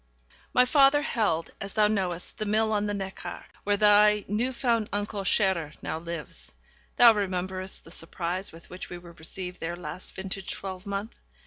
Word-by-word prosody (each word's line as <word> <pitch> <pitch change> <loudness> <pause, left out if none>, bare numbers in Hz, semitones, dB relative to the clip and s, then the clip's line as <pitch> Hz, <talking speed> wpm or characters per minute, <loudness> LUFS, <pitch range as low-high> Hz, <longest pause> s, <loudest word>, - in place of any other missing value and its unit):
My 250 - +5
father 280 +2 +5
held, 205 -12 0
as 195 0 -6
thou 215 -1 +4
knowest, 185 -5 -2
the 215 - 0
mill 220 +1 +2
on 210 -1 +1
the 205 - -1
Neckar, 195 -1 -6 0.2
where 205 0 +2
thy 210 0 +6
new 225 +6 0
found 235 -4 +1
uncle, 205 0 -2
Scherer, 180 -6 +2
now 160 - -2
lives. 165 - -7 0.4
Thou 235 -1 +9
rememberest 185 -2 -3
the 165 - -13
surprise 175 +3 -3
with 165 +1 -15
which 180 - -7
we 175 - -6
were 175 -1 -12
received 180 +3 -6
there 170 +1 -3
last 175 +1 -7
vintage 190 0 -5
twelvemonth. 200 +2 -5
195 Hz, 165 wpm, -28 LUFS, 180-210 Hz, 0.4 s, Thou